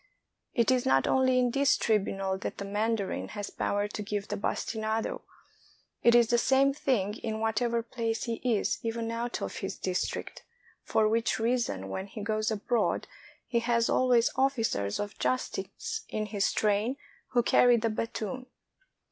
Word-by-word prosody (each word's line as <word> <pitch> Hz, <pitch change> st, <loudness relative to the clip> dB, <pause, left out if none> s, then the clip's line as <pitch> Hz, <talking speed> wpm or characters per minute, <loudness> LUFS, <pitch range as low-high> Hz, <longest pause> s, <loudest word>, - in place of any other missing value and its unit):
It 235 Hz, +2 st, +3 dB
is 255 Hz, -1 st, +2 dB
not 135 Hz, 0 st, +3 dB
only 260 Hz, -1 st, +3 dB
in 245 Hz, -1 st, +2 dB
his 280 Hz, 0 st, +3 dB
tribunal 195 Hz, -3 st, 0 dB
that -, -, -5 dB
the 200 Hz, -, -5 dB
mandarin 210 Hz, 0 st, -1 dB
has 205 Hz, -, -4 dB
power 205 Hz, 0 st, -1 dB
to 210 Hz, -, -5 dB
give 205 Hz, -1 st, -3 dB
the -, -, -1 dB
bastinado; 220 Hz, +2 st, -2 dB, 0.8 s
it 235 Hz, 0 st, +5 dB
is 235 Hz, -2 st, +5 dB
the 240 Hz, -, +4 dB
same 270 Hz, +2 st, +4 dB
thing 220 Hz, -7 st, 0 dB
in 220 Hz, -1 st, -4 dB
whatever 230 Hz, +1 st, 0 dB
place 230 Hz, -1 st, -2 dB
he 230 Hz, -1 st, -3 dB
is, 235 Hz, -5 st, +1 dB
even 230 Hz, 0 st, -2 dB
out 235 Hz, +1 st, -3 dB
of -, -, -4 dB
his 195 Hz, -, -4 dB
district, 185 Hz, -1 st, -3 dB, 0.4 s
for 215 Hz, -1 st, +2 dB
which 225 Hz, +1 st, +1 dB
reason 225 Hz, -, 0 dB
when 190 Hz, -, -4 dB
he 205 Hz, +1 st, -7 dB
goes 215 Hz, 0 st, 0 dB
abroad 225 Hz, +2 st, 0 dB, 0.4 s
he 235 Hz, -, +1 dB
has 235 Hz, 0 st, +1 dB
always 245 Hz, -2 st, +4 dB
officers 225 Hz, -, 0 dB
of 205 Hz, 0 st, -5 dB
justice 445 Hz, -, -2 dB
in 215 Hz, 0 st, -2 dB
his 205 Hz, -2 st, 0 dB
train 215 Hz, +5 st, +1 dB, 0.4 s
who 240 Hz, -1 st, +4 dB
carry 245 Hz, +1 st, +5 dB
the 230 Hz, 0 st, 0 dB
battoon. 230 Hz, +3 st, -4 dB
225 Hz, 160 wpm, -29 LUFS, 210-240 Hz, 0.8 s, it